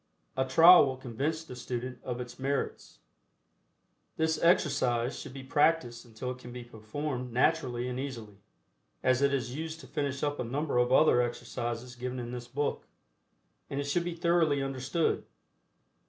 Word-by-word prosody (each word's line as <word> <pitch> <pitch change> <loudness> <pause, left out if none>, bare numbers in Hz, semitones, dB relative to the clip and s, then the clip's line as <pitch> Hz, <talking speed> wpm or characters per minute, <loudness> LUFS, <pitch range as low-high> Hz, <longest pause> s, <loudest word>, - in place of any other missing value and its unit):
A 130 - +1
trial 165 +4 +8
will 130 -1 -3
convince 140 +6 -3
the 125 - -9
student 125 +1 -5
of 125 -1 -4
its 125 0 -7
merits. 140 +1 -3 1.2
This 160 0 +1
exercise 130 -8 +2
should - - -8
be 135 0 -8
practiced 135 -4 +1
until 120 +2 -5
it 130 - -8
can 125 -1 -10
be 125 0 -7
performed 125 +3 -5
naturally 125 -2 +1
and 125 0 -3
easily, 115 -7 -6 0.6
as 130 0 +3
it 140 0 +4
is 125 -3 -1
used 160 +1 -5
to - - -12
finish 140 -3 -3
up 145 0 -1
a - - 0
number 135 +2 -1
of 125 0 +2
other 130 -2 +6
exercises 120 0 -4
given 125 +1 -4
in 120 -1 -5
this 120 -1 -6
book, 145 +4 -2 0.8
and 140 - -3
it - - 0
should 155 +5 0
be 175 -1 -4
thoroughly 165 -4 +2
understood. 135 +5 -1
130 Hz, 165 wpm, -30 LUFS, 120-145 Hz, 1.2 s, trial